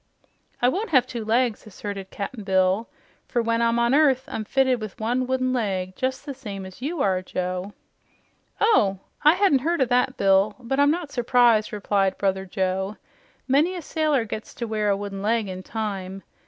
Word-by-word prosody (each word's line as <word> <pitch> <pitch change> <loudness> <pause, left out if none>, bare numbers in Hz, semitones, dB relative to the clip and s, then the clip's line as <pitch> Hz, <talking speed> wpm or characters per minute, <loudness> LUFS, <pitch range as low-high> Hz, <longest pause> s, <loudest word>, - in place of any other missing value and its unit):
"I - - +6
won't 390 - -1
have 260 -6 +4
two 240 -3 -5
legs," 230 0 0
asserted 200 -2 -7
Cap'n 215 +3 -6
Bill, 190 +2 +1 0.4
"for 240 - -1
when 230 0 +1
I'm 230 0 +2
on 235 +1 +2
earth 275 -3 +4
I'm 215 - -4
fitted 260 0 +2
with 215 -2 -7
one 245 +3 0
wooden 255 0 0
leg, 190 -6 -1
jes' 260 +1 -1
the 285 -1 -6
same 205 -7 -7
as 190 +4 -12
you 295 +2 -1
are, 185 -2 +1
Joe." 185 +2 -4 0.9
"Oh, 215 - +3 0.3
I 300 +3 +7
hadn't 370 -8 +4
heard 335 +6 0
o' 260 - +4
that, 250 +1 +1
Bill, 195 +1 +3
but 255 +3 -2
I'm 285 0 +5
not 320 -1 -1
surprised," 240 -3 +3
replied 200 -2 0
Brother 190 -1 -1
Joe. 190 +1 -2 0.5
"Many 300 +8 +3
a 355 - -5
sailor 300 -6 +1
gets 215 0 -7
to 235 - -4
wear 215 -2 -1
a 200 - +2
wooden 200 -1 -5
leg 220 +1 +1
in 185 -1 -6
time. 195 -2 -5
230 Hz, 185 wpm, -24 LUFS, 195-260 Hz, 0.9 s, I